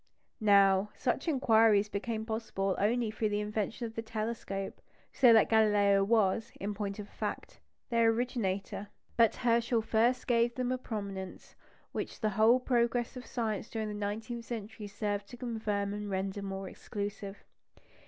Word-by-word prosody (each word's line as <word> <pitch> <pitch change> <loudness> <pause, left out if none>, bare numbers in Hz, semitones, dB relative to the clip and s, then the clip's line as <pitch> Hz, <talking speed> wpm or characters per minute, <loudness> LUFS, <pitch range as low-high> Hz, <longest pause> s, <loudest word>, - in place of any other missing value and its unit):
Now, 200 -1 +5
such 250 - -1
inquiries 225 -7 +4
became 220 +2 -3
possible 220 -4 -2
only 225 +2 +1
through 215 0 -1
the 205 0 0
invention 210 +3 -2
of 225 - -6
the 225 - -3
telescope, 220 -3 -4 0.3
so 250 -3 +6
that 225 -2 +6
Galileo 205 -3 +4
was, 215 0 +2
in 205 +2 -3
point 200 -1 -4
of 205 -1 -7
fact, - - -5 0.3
their 230 -1 +4
originator. 215 -4 -2 0.3
But 230 -2 +4
Herschel 235 -1 +1
first 235 +3 +2
gave 235 -1 +2
them 255 -1 -1
a 255 - -1
prominence 200 -5 -6 0.4
which - - -5
the 215 - +1
whole 220 +5 +5
progress 240 -1 0
of 250 - -8
science 220 -3 -2
during 220 -1 -3
the - - -4
nineteenth 220 +3 -4
century 220 -2 -6
served 205 0 -3
to 245 - -11
confirm 215 -4 -2
and 210 0 -5
render 195 +1 -2
more 195 -1 -5
exclusive. 200 0 -6
215 Hz, 155 wpm, -31 LUFS, 200-235 Hz, 0.4 s, so